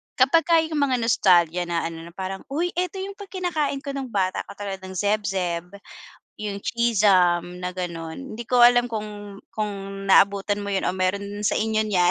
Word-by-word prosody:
kapagka 330 +6 +4
yung 315 -2 -2
mga 270 -3 +2
nostalgia 175 -6 +3
na 170 -1 -1
ano, 165 0 -5
na 170 - -13
parang, 190 0 -4
uy, 335 +6 -1
eto 365 +1 -1
yung 390 - -5
'pag 405 - -9
kinakain 315 -7 -2
ko 280 - -4
nung 275 -1 -4
bata, 190 -3 0
katulad 200 -1 -6
ng 190 0 -9
Zeb-Zeb, 190 -4 -1 0.7
yung 205 -1 -3
Cheez-Zum 185 -6 +2
na 180 - -2
gano'n. 175 +6 -6
Hindi 235 - -5
ko 250 - +3
alam 245 0 +6
kung 210 -2 -6 0.2
kung 195 -2 -4
naabutan 200 +1 +4
mo 200 - -3
yun 195 - 0
o - - +2
meron 200 +2 -2
sa - - +2
inyo 220 0 0
niyan. 180 -4 +3
200 Hz, 180 wpm, -24 LUFS, 185-245 Hz, 0.7 s, alam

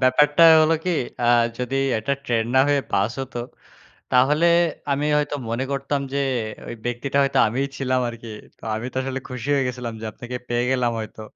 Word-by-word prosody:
ব্যাপারটা 145 +5 +4 0.2
হলো 155 +1 +4
কি 180 - 0 0.3
আ - - +1 0.3
যদি 125 +2 -2 0.2
একটা 125 +6 -2
ট্রেন 115 -4 0
না 130 - +6
হয়ে 145 -1 +3
বাস 100 +3 +1
হত 135 -1 -7 0.8
তাহলে 145 +6 +4 0.5
আমি 140 +1 0
হয়তো 145 0 -1
মনে 115 +3 -1
করতাম 140 +1 -1
যে 140 - 0 0.5
ওই - - -6
ব্যক্তিটা 120 +3 -2
হয়তো 135 - +1
আমিই 130 +6 -1
ছিলাম 130 -1 0
আরকি। 115 0 -10 0.3
তো - - -28
আমি 110 +2 -4
তো - - -4
আসলে 135 0 -3
খুশি 125 0 -6
হয়ে 135 -2 +1
গেছিলাম 125 -2 -5
যে - - -5
আপনাকে 120 +3 -8
পেয়ে 120 0 +1
গেলাম 125 -2 +1
হয়তো। 110 0 -7
130 Hz, 185 wpm, -22 LUFS, 120-140 Hz, 0.8 s, না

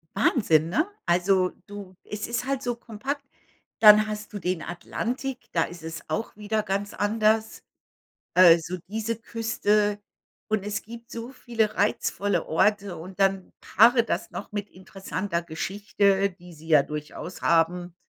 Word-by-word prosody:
Wahnsinn, 165 - +3
ne? 310 - +1 0.2
Also, 180 +1 +2 0.2
du 200 -2 -9
es 210 0 -5
ist 240 +1 -2
halt 270 0 -1
so 245 -1 -1
kompakt. 255 +5 -5 0.6
Dann 215 0 +8
hast 210 0 -6
du 205 - -4
den 180 -2 -2
Atlantik, 250 +9 -4
da 165 - +3
ist 175 -1 -8
es 160 0 -6
auch 225 - -3
wieder 215 +1 -1
ganz 200 0 -2
anders. 220 +1 +1 0.7
Äh, 175 -2 +8
so 170 +3 -5
diese 220 +2 -2
Küste. 215 -2 0 0.5
Und 215 -2 0
es 210 0 -3
gibt 230 +1 -11
so 230 +2 -6
viele 230 -5 -1
reizvolle 205 -1 0
Orte 200 +2 +1
und 185 +4 -10
dann 195 -1 +1
paare 235 +2 +5
das - - -3
noch 205 - -7
mit 205 0 -4
interessanter 190 -1 -4
Geschichte, 200 +3 0
die 180 -1 -15
sie 160 0 -14
ja 155 -3 +6
durchaus 150 +5 -7
haben. 170 +1 +1
205 Hz, 150 wpm, -26 LUFS, 180-220 Hz, 0.7 s, Dann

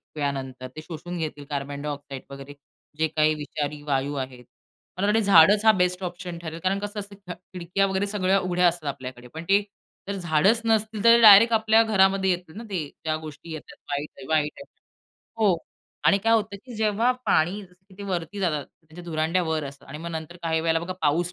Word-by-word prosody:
वेळानंतर 135 -3 -3
ते 155 - -7
शोषून 175 +2 -7
घेतील 150 -3 -5
कार्बन 140 0 -4
डायऑक्साईड 145 -2 -6
वगैरे 140 +1 -9 0.4
जे 160 0 +2
काही 155 0 +2
विषारी 150 0 -4
वायू 140 0 0
आहेत. 130 -2 -5 0.5
मला 195 +2 0
वाटतं 210 +2 +3
झाडच 200 0 +6
हा 220 - +9
बेस्ट 180 -2 0
ऑप्शन 175 -1 -5
ठरेल 165 -1 -7
कारण 190 +1 +1
कसं 205 +1 -5
असतं 200 -2 -9
खिडक्या 180 +2 -2
वगैरे 190 +1 -1
सगळ्या 195 -1 +1
उघड्या 180 -1 +2
असतात 170 -3 -2
आपल्याकडे 125 -2 -8
पण 160 +1 -6
ते 200 +1 +5 0.5
जर 200 - -3
झाडच 180 +6 +2
नसतील 220 -1 0
तर 230 0 +7
डायरेक्ट 220 +1 +9
आपल्या 220 0 +4
घरामध्ये 195 -3 +3
येतील 175 -2 -4
ना 230 - -6
ते 180 -6 -2 0.2
ज्या 155 -1 0
गोष्टी 155 +1 -10
येतात 155 - -9
वाईट 145 +1 -2
आहे, 135 - -10
वाईट 155 -1 +1
आहे. 280 - -10 0.7
हो. 205 -5 +3 0.5
आणि 200 - +5
काय 225 - +4
होतं 215 -2 +1
की 250 -2 -10
जेव्हा 220 +2 +2 0.2
पाणी 180 +6 +2 0.4
वरती 180 +1 -3
जातं 155 -6 0
त्यांच्या 160 +4 -15
धुरांड्यावर 160 -1 0
असतं 140 0 -10
आणि 150 +2 -8
मग 170 +2 -6
नंतर 160 +1 -6
काही 160 -1 0
वेळेला 165 0 +1
बघा 170 +2 -4
पाऊस 165 +4 +1
175 Hz, 185 wpm, -25 LUFS, 150-200 Hz, 0.7 s, हा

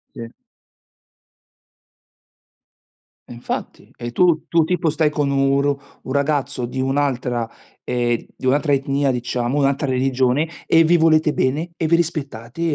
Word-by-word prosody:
Sì. 115 -1 -8 3.0
Infatti, 120 0 -6
e 120 0 -6
tu 170 +1 +3
tu 165 -2 +3
tipo 175 -2 0
stai 155 0 +2
con 145 -2 -1
un 135 0 +2
r 145 0 +2 0.3
un 130 - -5
ragazzo 140 -3 0
di 130 +2 -6
un'altra 130 -4 -1 0.3
ehm, 120 -1 0 0.2
di - - -13
un'altra 145 +2 +2
etnia 140 0 0
diciamo, 125 +1 -2
un'altra 140 0 +1
religione, 130 +3 +1 0.2
e 165 0 +5
vi 170 +1 +4
volete 155 -1 +4
bene 150 +7 -1
e 165 - -2
vi 170 +1 +4
rispettate, 140 -5 -4
140 Hz, 130 wpm, -20 LUFS, 125-155 Hz, 3.0 s, e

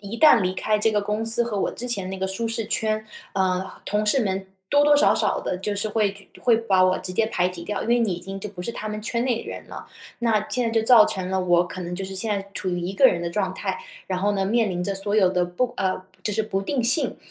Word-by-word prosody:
一 205 +3 -7
旦 305 -9 +7
离 185 - 0
开 215 +3 0
这 220 +1 +2
个 210 - +2
公 210 +2 -2
司 225 +1 +3
和 225 -4 -2
我 - - 0
之 245 - -7
前 195 -6 -2
那 190 - -5
个 190 - -1
舒 195 +5 -3
适 225 -1 -3
圈， 215 0 -1 0.3
呃， 185 0 0
同 210 +1 0
事 245 +5 +3
们 190 -2 -2 0.2
多 290 0 +4
多 295 - +6
少 290 - +5
少 - - 0
地， 180 - -2
就 210 - -1
是 205 +2 -2
会 210 -2 +1 0.2
就 - - -16
会 235 -2 +4
把 190 -5 +3
我 185 0 +2
直 185 - -6
接 200 +5 +1
排 180 -4 +1
挤 175 -2 -8
掉。 210 +1 -3
因 - - -4
为 240 +1 +4
你 220 -5 +1
已 175 - -5
经 195 +2 -7
就 205 +1 -6
不 185 -3 -9
是 180 - -3
他 215 - -6
们 215 0 -4
圈 235 +2 -2
内 250 -3 +1
的 - - -10
人 - - -7
了， - - -10 0.3
那 220 -3 +1
现 250 - 0
在 230 - +1
就 225 -1 +1
造 235 -3 +8
成 185 -1 -3
了， 190 0 +1
我 175 -1 +3
可 185 - -8
能 175 0 -4
就 190 +2 -4
是 190 - -7
现 205 +4 -3
在 195 - -8
处 190 - -3
于 175 -1 -1
一 180 +3 -3
个 260 +7 +6
人 170 -6 +1
的 170 - -2
状 190 +1 -1
态， - - -3 0.3
然 185 - -2
后 205 +1 +2
呢， 195 -1 0
面 225 +2 +2
临 180 0 -2
着 200 - -2
所 205 +2 0
有 190 -4 +5
的 180 -1 +1
不 235 +8 -1
呃， 185 -1 0 0.2
就 210 - -1
是 220 - +1
不 205 -3 -2
定 245 +4 -1
性。 245 +3 +1
205 Hz, 315 characters per minute, -24 LUFS, 185-225 Hz, 0.3 s, 造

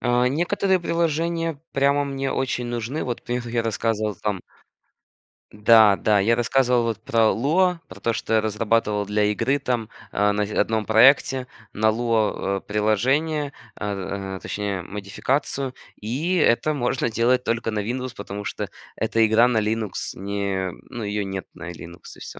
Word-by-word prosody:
А, 125 0 +2
некоторые 180 +6 +1
приложения 165 -2 -1
прямо 140 +1 +2
мне 135 -1 -2
очень 130 -2 -1
нужны, 120 +5 -3
вот 120 -2 -4
про 120 - -3
них 120 -1 -3
я 115 0 -1
рассказывал, 110 -1 -1
там 100 +1 -3 1.1
Да, 105 -1 +6
да, 105 0 +2
я 115 +4 +3
рассказывал 125 0 +2
вот 115 -2 -2
про 115 -1 +3
Lua, 175 +8 +2
про 95 +1 -12
то 115 - 0
что 110 0 -3
я 110 - +4
разрабатывал 105 -1 0
для 105 0 +1
игры 115 +7 +1
там, 120 -5 -2 0.2
а, 105 +1 +2
на 105 0 0
в 105 - -7
одном 110 -1 +1
проекте 130 +3 +4 0.3
на 110 +1 +1
Lua, 110 -3 +1
а, - - -4
приложение, 135 +10 0 0.2
а, 100 -1 -4
а, - - -7
точнее 100 -3 -3
модификацию 130 - -2 0.3
и 140 - -1
это 155 -1 +3
можно 120 -3 0
делать 125 +3 +2
только 115 -1 -1
на 105 - -2
Windows, 125 +4 -3
потому 100 0 -6
что - - -4 0.3
эта 115 0 +2
игра 110 +3 +5
на 120 -3 +1
Linux 110 -1 -1 0.2
не, 100 -1 -2 0.2
ну 120 - -6
ее 105 0 -2
нет 95 -1 -5
на 90 0 -7
Linux, 85 +1 -11 0.2
и - - -14
всё. - - -9
115 Hz, 165 wpm, -23 LUFS, 105-130 Hz, 1.1 s, Да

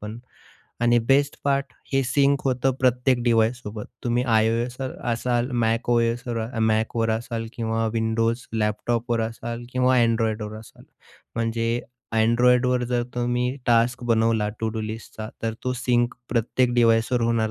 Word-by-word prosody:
पण 105 +2 -7 0.6
आणि 120 0 +4
best 140 +2 +3
part 140 -3 0 0.2
हे 135 - +3
सिंक 140 +2 +2
होतं 130 0 +1
प्रत्येक 125 0 +2
डिव्हाइससोबत. 115 -2 0 0.2
तुम्ही 120 +1 +1
iOSवर 120 +3 0 0.2
असाल, 120 +2 0
MacOS 115 +1 +1 0.5
Macवर 110 +1 0
असाल 115 0 -3
किंवा 115 -1 -1
Windows 115 +2 0
लॅपटॉपवर 115 +2 0
असाल 115 +1 -6
किंवा 130 0 +3
Androidवर 110 -2 0
असाल, 110 - -15 0.5
म्हणजे 115 +1 -1 0.4
Androidवर 125 +2 +3
जर 120 -1 +1
तुम्ही 125 +2 0
टास्क 120 +1 +2
बनवला 115 -2 +2
टू-डू 110 0 -2
लिस्टचा, 110 0 -6
तर 115 -1 -1
तो 125 - 0
सिंक 120 -1 +1
प्रत्येक 120 +1 +1
डिव्हाइसवर 115 +1 +3
होणार 115 -2 +1
120 Hz, 125 wpm, -24 LUFS, 115-125 Hz, 0.6 s, आणि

